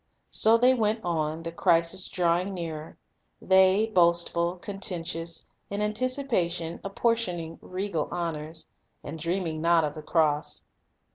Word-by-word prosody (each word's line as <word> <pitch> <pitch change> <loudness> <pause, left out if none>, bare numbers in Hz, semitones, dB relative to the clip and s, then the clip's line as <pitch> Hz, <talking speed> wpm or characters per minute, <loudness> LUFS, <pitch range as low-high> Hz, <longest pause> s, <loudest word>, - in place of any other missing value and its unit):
So 225 +1 +6
they 250 +2 +5
went 220 -2 0
on, 160 -2 -2
the 165 - -5
crisis 170 +2 +2
drawing 180 +2 0
nearer; 160 -3 -6 0.4
they, 190 +2 +4
boastful, 170 -3 +3
contentious, 175 -4 -4 0.2
in 200 - -3
anticipation 210 -8 -1
apportioning 195 -6 -1
regal 185 -4 -3
honors, 160 -2 -4 0.4
and 160 +3 -7
dreaming 165 -1 -2
not 170 0 +4
of 150 -1 -2
the 155 - -8
cross. 150 -2 0
170 Hz, 120 wpm, -27 LUFS, 165-195 Hz, 0.4 s, So